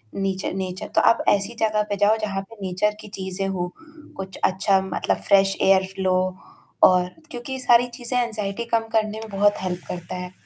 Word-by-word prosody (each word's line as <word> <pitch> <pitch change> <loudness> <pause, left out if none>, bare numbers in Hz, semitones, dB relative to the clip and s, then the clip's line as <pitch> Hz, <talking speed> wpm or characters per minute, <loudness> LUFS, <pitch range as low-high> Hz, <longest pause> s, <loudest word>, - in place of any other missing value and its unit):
नीचर 195 -1 -2
nature 185 -1 -4
तो - - +5
आप 230 - +4
ऐसी 200 +3 +1
जगह 215 -1 +2
पे 205 - 0
जाओ 205 +2 +4
जहाँ 195 -2 -2
पे 225 - -13
नेचर 190 +3 0
की - - -10
चीज़ें 190 0 -3
हो, 180 -2 -3 0.5
कुछ 190 -1 -7
अच्छा 190 +1 +3
मतलब 190 - -1
फ्रेश 195 -1 +4
एयर 190 0 +5
फ्लो 190 -1 0 0.7
और 180 -1 +6 0.2
क्योंकि 260 +1 -5
सारी 245 -1 +4
चीज़ें 245 0 -1
एंग्ज़ायटी 215 -1 -3
कम 225 -1 +2
करने 215 -1 +1
में 220 0 -8
बहुत 205 +1 +3
हेल्प 180 -1 -3
करता 175 +1 -6
है। 180 0 -6
195 Hz, 185 wpm, -23 LUFS, 190-215 Hz, 0.7 s, और